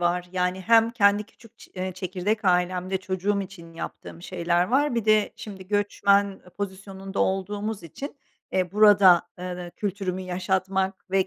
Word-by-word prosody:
var. 175 +1 0
Yani, 180 0 0
hem 225 +3 +4
kendi 205 -2 +3
küçük 225 +1 -20
ç - - -15
eee, 185 0 -3
çekirdek 190 +4 -2
ailemde 180 +1 +1
çocuğum 190 +2 -1
için 180 -3 -9
yaptığım 165 0 -8
şeyler 175 -1 0
var. 270 +5 +1
Bir 230 -3 -1
de 215 -1 +3
şimdi 190 -3 -9
göçmen 200 -1 +2 0.2
pozisyonunda 195 0 -5
olduğumuz 205 +2 -1
için, 275 - -8 0.4
eee, 185 -1 0
burada, 205 -4 +7 0.2
eee, 180 - -6
ııı, 180 -1 -7
kültürümü 195 -2 -3
yaşatmak 190 +1 -2
ve 190 -1 +2
190 Hz, 150 wpm, -25 LUFS, 180-205 Hz, 0.4 s, burada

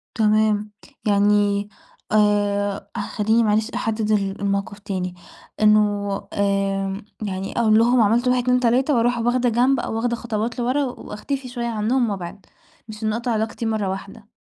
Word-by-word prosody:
تمام، 215 -1 +2 0.4
يعني 205 0 +2 0.4
آآ، 205 -1 +1
خلّيني 220 +3 +1
معلش 215 +1 +1
أحدّد 220 -1 -1
ال 200 -1 0
الموقف 200 +1 -2
تاني، 185 -3 -4 0.5
إنُّه 210 -1 +3 0.2
آآ، 195 0 0 0.2
يعني 195 -1 -3
أقول 220 -2 +4
لهُم 240 +1 +4
عملتوا 235 +4 +3
1 250 -1 +1
2 250 0 +3
3 255 +4 +2
وأروح 240 +1 +2
واخدة 240 +1 +1
جنب، 250 +3 +2
أو - - -3
واخدة 235 +1 0
خطوات 230 0 -3
لِورا، 255 +4 +1
وأختفي 265 +1 -5
شويّة 240 -1 -4
عنهم 230 +2 0
وأبعِد، 190 0 -6 0.4
مش 215 0 -9
إنّي 215 0 0
أقطع 235 +1 -2
علاقتي 220 +1 -2
مرّة 215 -3 -1
واحدة. 195 +2 -7
215 Hz, 145 wpm, -22 LUFS, 205-235 Hz, 0.5 s, أقول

